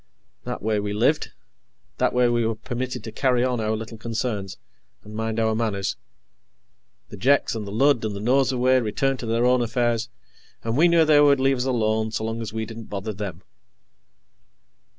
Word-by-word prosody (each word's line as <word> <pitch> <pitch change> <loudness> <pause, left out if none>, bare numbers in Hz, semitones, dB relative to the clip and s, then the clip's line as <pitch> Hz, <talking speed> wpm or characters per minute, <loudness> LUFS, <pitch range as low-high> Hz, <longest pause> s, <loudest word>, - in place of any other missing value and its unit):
That - - -5
way, 110 -1 +1
we 100 0 -3
lived. 125 +9 +1 0.7
That - - +2
way, 125 0 +3
we 120 -1 +1
were 110 0 0
permitted 125 +2 -5
to 110 - -7
carry 125 +1 +1
on 125 -2 0
our 110 0 0
little 115 0 -7
concerns, 110 -4 -3 0.5
and 105 - -12
mind 110 0 -2
our 110 -1 +2
manners. 110 -4 -1 1.1
The 105 - -9
Jeks 135 +8 +2
and 110 -3 -5
the - - -6
Lud 135 +2 +3
and 105 -2 -2
the - - -5
Nosurwey 130 +2 +3
returned 135 +5 -1
to 120 - -5
their 115 +2 +1
own 125 0 +4
affairs, 120 0 0 0.5
and 115 0 -2
we 160 +6 +5
knew 170 -1 +4
they 150 -1 +6
would 140 -2 +5
leave 135 0 +2
us 125 - -2
alone 110 -3 +1
so 110 - -3
long 115 +1 -3
as 110 - -5
we 110 0 -3
didn't 115 +1 -9
bother 100 +2 -4
them. 95 -3 -6
115 Hz, 190 wpm, -24 LUFS, 110-125 Hz, 1.1 s, they